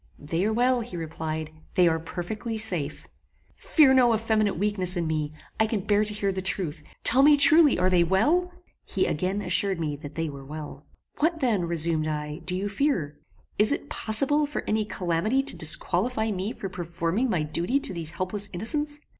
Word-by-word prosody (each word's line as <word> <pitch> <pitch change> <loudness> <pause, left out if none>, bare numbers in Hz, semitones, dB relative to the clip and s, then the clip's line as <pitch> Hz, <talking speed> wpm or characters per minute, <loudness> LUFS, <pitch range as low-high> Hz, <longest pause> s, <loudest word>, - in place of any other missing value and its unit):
"They 165 +5 -3
are 215 - +1
well," 245 +2 +2
he 220 -6 -7
replied; 160 -1 -5 0.2
"they 180 -1 +5
are 165 -1 +1
perfectly 210 +7 -5
safe." 175 -9 -1 0.5
"Fear 290 -5 +4
no 245 -3 +4
effeminate 215 -3 0
weakness 190 -2 -1
in 170 - -1
me: 155 -2 -2 0.3
I 220 - +3
can 215 -2 -2
bear 205 +2 +2
to 210 0 -1
hear 200 -1 0
the 190 0 -4
truth. 180 -5 -3 0.2
Tell 255 +3 +7
me 290 +1 +6
truly, 305 0 +6
are 180 +1 +2
they 180 -2 +4
well?" 295 - +2 0.3
He - - -1
again 185 +6 -1
assured 195 -2 +2
me 150 -3 -2
that 145 0 -10
they 165 0 -1
were 140 -2 -8
well. 145 0 -9 0.3
"What 325 +2 +1
then," 225 - +1
resumed 165 -2 +1
I, 150 0 -4
"do 180 - +1
you 195 +2 -2
fear? 200 - -1 0.4
Is 210 +4 +4
it 290 - -3
possible 275 +7 +1
for 295 - -4
any 215 0 0
calamity 195 +7 0
to - - -5
disqualify 220 -3 0
me 195 +2 -3
for 195 - -6
performing 175 +6 -2
my 175 -8 0
duty 170 - 0
to 280 -8 -2
these 165 -3 -4
helpless 195 +4 -3
innocents? 295 - -2
195 Hz, 190 wpm, -26 LUFS, 165-230 Hz, 0.5 s, Tell